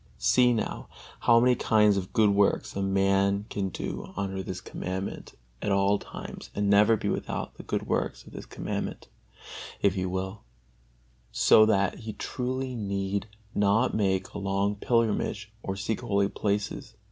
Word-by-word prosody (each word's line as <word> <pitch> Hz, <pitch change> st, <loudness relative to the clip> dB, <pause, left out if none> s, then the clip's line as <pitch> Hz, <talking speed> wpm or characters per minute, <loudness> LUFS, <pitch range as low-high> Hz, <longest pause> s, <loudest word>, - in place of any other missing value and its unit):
See 125 Hz, -1 st, +4 dB
now, 115 Hz, -2 st, -2 dB, 0.3 s
how 115 Hz, 0 st, +5 dB
many 125 Hz, +1 st, +5 dB
kinds 105 Hz, -3 st, +3 dB
of 95 Hz, -2 st, -3 dB
good 105 Hz, -2 st, +4 dB
works 100 Hz, 0 st, +2 dB
a 100 Hz, -, -1 dB
man 95 Hz, +1 st, +2 dB
can 95 Hz, -2 st, -1 dB
do -, -, -5 dB
under 95 Hz, -1 st, -2 dB
this 95 Hz, -1 st, -5 dB
Commandment 95 Hz, +1 st, -5 dB, 0.3 s
at 105 Hz, -, -1 dB
all 100 Hz, +1 st, +3 dB
times -, -, -9 dB
and 100 Hz, 0 st, 0 dB
never 105 Hz, +2 st, +5 dB
be -, -, -3 dB
without -, -, -3 dB
the -, -, -10 dB
good -, -, -3 dB
works -, -, -2 dB
of -, -, -14 dB
this -, -, -8 dB
Commandment, -, -, -5 dB, 0.7 s
if 100 Hz, -, +3 dB
he 95 Hz, -1 st, -2 dB
will; 95 Hz, +3 st, -4 dB, 0.9 s
so 110 Hz, 0 st, +6 dB
that 100 Hz, -3 st, +1 dB
he 110 Hz, -2 st, -6 dB
truly 130 Hz, +4 st, -3 dB
need 100 Hz, -2 st, -2 dB, 0.3 s
not 105 Hz, +5 st, +2 dB
make 95 Hz, -3 st, 0 dB
a -, -, -4 dB
long 100 Hz, +1 st, 0 dB
pilgrimage 110 Hz, -1 st, 0 dB
or 95 Hz, -, -3 dB
seek 105 Hz, +2 st, -2 dB
holy 100 Hz, 0 st, +1 dB
places. 105 Hz, +2 st, -2 dB
100 Hz, 160 wpm, -28 LUFS, 95-110 Hz, 0.9 s, so